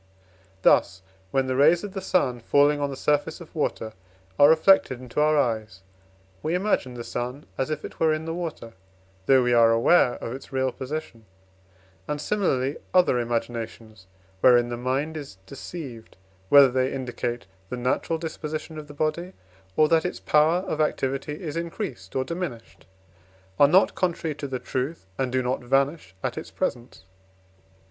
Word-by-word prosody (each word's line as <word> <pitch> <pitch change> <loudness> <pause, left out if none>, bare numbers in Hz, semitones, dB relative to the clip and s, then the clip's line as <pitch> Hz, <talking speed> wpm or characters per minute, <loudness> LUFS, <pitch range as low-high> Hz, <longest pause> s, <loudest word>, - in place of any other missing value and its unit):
Thus, 95 +1 +3 0.3
when 135 +5 +1
the 130 0 -1
rays 160 +7 +4
of 205 -2 -6
the 195 - -4
sun 135 -10 +1
falling 145 +5 +3
on 145 - 0
the 135 - -5
surface 150 +4 0
of 170 - -13
water 115 -8 -2 0.5
are 145 - +8
reflected 160 -5 +4
into 125 +3 -3
our 155 0 +3
eyes, 110 -7 -1 0.6
we 160 +3 -1
imagine 180 -10 0
the 120 - -6
sun 125 +5 -5
as 135 - -2
if 155 -1 -3
it - - -10
were 160 -1 +3
in 155 +1 -2
the 165 - -3
water, 165 -9 -6 0.5
though 130 -1 +5
we 125 0 +2
are 115 -1 +6
aware 120 +3 +4
of 115 - -6
its 135 - -10
real 130 -1 0
position; 130 -5 -7 0.8
and 150 0 -2
similarly 145 -8 0 0.2
other 175 -9 +4
imaginations, 115 -3 -4 0.3
wherein 120 +2 +5
the 120 - -3
mind 130 +6 -2
is 140 -10 -9
deceived, 135 - -9 0.3
whether 140 -2 +8
they 130 +1 +1
indicate 120 -3 -4 0.2
the 125 - -4
natural 130 +6 -1
disposition 155 -1 -5
of 150 - -10
the 145 - -12
body, 170 +5 -2 0.4
or 155 - +5
that 165 0 +3
its 180 - -4
power 155 +4 +3
of 155 -5 -2
activity 135 0 -1
is 155 -2 -4
increased 165 - -5
or 130 - +1
diminished, 170 -7 -6 0.7
are 145 - +8
not 185 +7 +4
contrary 170 -3 -1
to 145 0 -6
the 130 -1 -3
truth, 130 - -4
and 130 -2 0
do 130 0 0
not 125 +2 -1
vanish 135 - 0
at - - -2
its - - -9
presence. 120 0 -4
135 Hz, 170 wpm, -25 LUFS, 125-155 Hz, 0.8 s, are